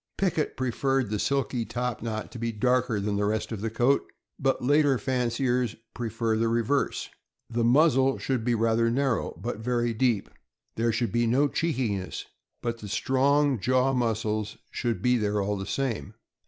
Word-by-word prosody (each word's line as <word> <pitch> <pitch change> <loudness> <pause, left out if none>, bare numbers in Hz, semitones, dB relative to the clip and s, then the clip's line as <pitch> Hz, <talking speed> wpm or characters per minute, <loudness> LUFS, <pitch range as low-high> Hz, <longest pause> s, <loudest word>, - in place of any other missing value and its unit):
Pickett 175 -5 0
preferred 130 -1 0
the 105 - -1
silky 135 -2 0
top 120 +1 -3
knot 110 -1 -4
to 120 - -8
be 115 0 -1
darker 125 0 +1
than 100 0 -1
the 105 - +1
rest 110 +2 -1
of 110 -3 -4
the 115 - -1
coat, 120 +5 +2 0.4
but 135 -2 +1
later 145 -1 +4
fanciers 125 -2 0 0.2
prefer 115 -1 -1
the 115 +1 +1
reverse. 115 +5 0 0.4
The 115 0 0
muzzle 135 +1 +4
should 130 -4 -1
be 120 0 +1
rather 115 +1 +2
narrow, 130 -6 0
but 110 +3 -4
very 120 0 0
deep. 115 -3 +1 0.5
There 115 +1 +1
should 115 -2 -1
be 120 +2 +2
no 135 +5 +3
cheekiness, 125 - -2 0.4
but 115 -1 -2
the 105 - -8
strong 135 +4 +2
jaw 130 +4 +2
muscles 110 -3 -1
should 115 -6 -2
be 125 0 +4
there 105 -2 0
all 100 +1 0
the 95 0 -5
same. 115 -6 -2
120 Hz, 165 wpm, -27 LUFS, 110-130 Hz, 0.5 s, later